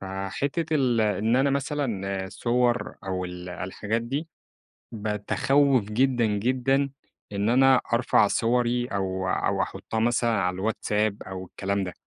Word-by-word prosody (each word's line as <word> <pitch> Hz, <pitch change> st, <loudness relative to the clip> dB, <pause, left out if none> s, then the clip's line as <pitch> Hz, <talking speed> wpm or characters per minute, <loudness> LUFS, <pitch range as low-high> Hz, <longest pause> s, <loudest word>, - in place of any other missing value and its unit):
فحتّة 115 Hz, -, -2 dB
ال-‑ 125 Hz, -4 st, +2 dB, 0.2 s
إن 115 Hz, +4 st, +2 dB
أنا 135 Hz, +1 st, +3 dB
مثلًا 115 Hz, -9 st, -2 dB
الصوَر 120 Hz, +4 st, 0 dB
أو 95 Hz, -1 st, -2 dB
الـ‑ 90 Hz, 0 st, -7 dB
الحاجات 105 Hz, +5 st, -3 dB
دي، 140 Hz, +7 st, -3 dB, 0.6 s
باتخوّف 115 Hz, +4 st, +1 dB
جدًا، 120 Hz, +2 st, +2 dB
جدًا، 130 Hz, +6 st, +1 dB, 0.4 s
إن 100 Hz, +2 st, 0 dB
أنا 130 Hz, +1 st, +5 dB
أرفع 120 Hz, -3 st, +4 dB
صوَري 120 Hz, +2 st, +1 dB
أو 95 Hz, -3 st, -2 dB
أو -, -, +1 dB
أحطّها 110 Hz, -, -4 dB
مثلًا 120 Hz, 0 st, +2 dB
على 90 Hz, -4 st, +1 dB
الواتساب 105 Hz, +1 st, -1 dB
أو 95 Hz, 0 st, -7 dB
الكلام 100 Hz, +2 st, -2 dB
ده، 90 Hz, -, -5 dB
115 Hz, 130 wpm, -26 LUFS, 95-130 Hz, 0.6 s, أنا